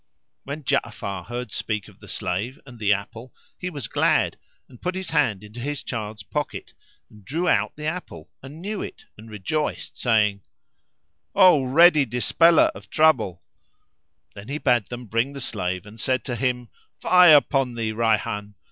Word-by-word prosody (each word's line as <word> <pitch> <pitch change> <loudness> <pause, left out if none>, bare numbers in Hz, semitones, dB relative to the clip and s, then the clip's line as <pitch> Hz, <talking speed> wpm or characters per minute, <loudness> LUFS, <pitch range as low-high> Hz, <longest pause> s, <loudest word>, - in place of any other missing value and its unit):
When 145 +2 -6
Ja'afar 100 -7 -2
heard 120 -2 -5
speak 105 -3 -3
of - - -18
the - - -14
slave 100 +9 -3
and 125 -3 -13
the 105 -1 +2
apple, 115 +5 -3 0.2
he 180 - -5
was 145 -9 -6
glad - - +2 0.3
and 125 - -17
put 180 +1 -2
his 190 0 -5
hand 130 -11 +1
into 105 +3 -11
his 145 +3 -4
child's 110 -3 -5
pocket 150 +7 -4
[FN#361] - - -35
and 105 -2 -17
drew 165 +6 -2
out - - +2
the 150 - -7
apple 155 - -5
and 145 +6 -11
knew 210 +1 -3
it - - -8
and 110 +2 -13
rejoiced 110 +9 -3
saying, 105 -4 +2 0.9
"O 180 -8 +6
ready 155 +2 +6
Dispeller 125 +9 +4
of - - -13
trouble 125 - +2 0.4
" 75 0 -52
[FN#362] - - -34
Then 100 +1 -11
he 140 +3 -3
bade 125 -7 +2
them 120 0 -7
bring 115 +6 -1
the 140 - -7
slave 90 -5 -3
and 105 +2 -12
said 130 0 0
to 125 - -3
him, 125 -2 -1 0.3
"Fie 180 -2 +7
upon 135 -4 +4
thee, 115 -2 -2
Rayhan! 105 -2 -1
120 Hz, 175 wpm, -24 LUFS, 105-145 Hz, 0.9 s, Fie